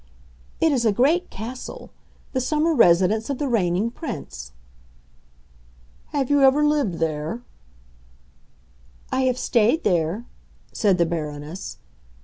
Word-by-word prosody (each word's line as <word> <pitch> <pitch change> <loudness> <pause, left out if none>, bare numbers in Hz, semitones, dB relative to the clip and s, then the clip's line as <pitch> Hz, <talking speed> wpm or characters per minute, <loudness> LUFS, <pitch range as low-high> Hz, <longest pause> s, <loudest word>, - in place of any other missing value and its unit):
"It 325 - +3
is 255 -4 +1
a 220 - +4
great 290 - +2
castle,—the 250 +3 -8
summer 305 +5 +1
residence 210 - +4
of 280 - -1
the 290 - -2
Reigning 205 -2 +1
Prince." 65 - -7 1.6
"Have 280 -2 -2
you 285 -1 +4
ever 275 +2 +5
lived 290 - +1
there?" 160 +7 -3 1.7
"I 260 - +1
have 255 -1 +1
stayed 240 +7 +2
there," 175 +4 0 0.5
said 200 -5 +2
the 170 - +3
Baroness. 155 +1 -5
230 Hz, 115 wpm, -23 LUFS, 175-275 Hz, 1.7 s, ever